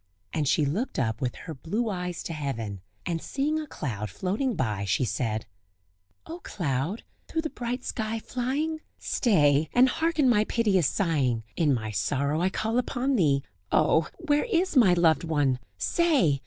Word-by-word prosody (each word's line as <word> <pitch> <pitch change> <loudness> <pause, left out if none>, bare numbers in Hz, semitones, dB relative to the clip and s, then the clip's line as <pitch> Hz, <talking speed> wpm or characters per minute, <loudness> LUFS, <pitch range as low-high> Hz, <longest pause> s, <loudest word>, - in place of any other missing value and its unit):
And 150 -3 0
she 150 +2 +3
looked 195 - -2
up 110 -3 -1
with 125 -2 -1
her 165 - -7
blue 205 - -2
eyes 180 -4 -3
to 165 - -4
heaven, 115 - -4 0.2
and 165 -2 -2
seeing 300 +3 -1
a 310 - -5
cloud 105 - -4
floating 200 - -1
by, 105 -6 -1
she 100 +6 +1
said: 110 -2 -2 0.8
"O 335 +2 -7
cloud! 165 - -2 0.2
through 320 -1 -2
the 315 - -3
bright 245 +1 -4
sky 220 0 -2
flying! 275 +8 -2 0.2
Stay, 150 - +2
and 250 +1 +6
hearken 320 +1 +1
my 225 -4 +4
piteous 200 - +2
sighing! 140 - +1
In 155 -4 +2
my 110 -4 -1
sorrow 140 +8 0
I 185 - +3
call 220 +5 0
upon 255 +2 0
thee; 140 - +3 0.3
Oh! 160 -1 +3
where 295 -4 +1
is 375 -7 +1
my 205 -9 +6
loved 165 -2 +3
one? 145 -6 +1 0.2
say! 280 - +2
175 Hz, 165 wpm, -27 LUFS, -, 0.8 s, and